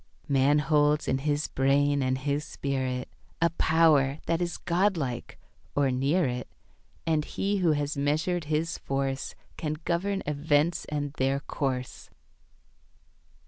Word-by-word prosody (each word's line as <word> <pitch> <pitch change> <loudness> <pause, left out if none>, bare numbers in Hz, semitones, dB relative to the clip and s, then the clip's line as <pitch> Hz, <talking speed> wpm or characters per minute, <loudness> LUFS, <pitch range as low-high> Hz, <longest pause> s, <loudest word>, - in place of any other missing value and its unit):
Man 140 +1 +4
holds 150 0 +2
in 130 - +1
his 145 +1 0
brain 140 +1 +2
and 130 0 +1
his 140 +2 -1
spirit 130 -3 -3 0.3
A 170 0 +3
power 155 -4 +3
that 165 +1 0
is 175 0 -2
God 185 +3 +1
like, 125 -5 -4 0.4
or 140 -2 +3
near 140 +8 +2
it, 125 -1 -3 0.6
And 160 -2 +2
he 200 +6 -1
who 175 -5 +3
has 145 0 -1
measured 155 +4 0
his 155 +2 -1
force 135 0 -2 0.2
Can 155 -2 -2
govern 195 +3 0
events 150 +3 +1
and 145 -1 -3
their 135 +1 +1
course. 130 -4 -3
145 Hz, 135 wpm, -28 LUFS, 135-160 Hz, 0.6 s, Man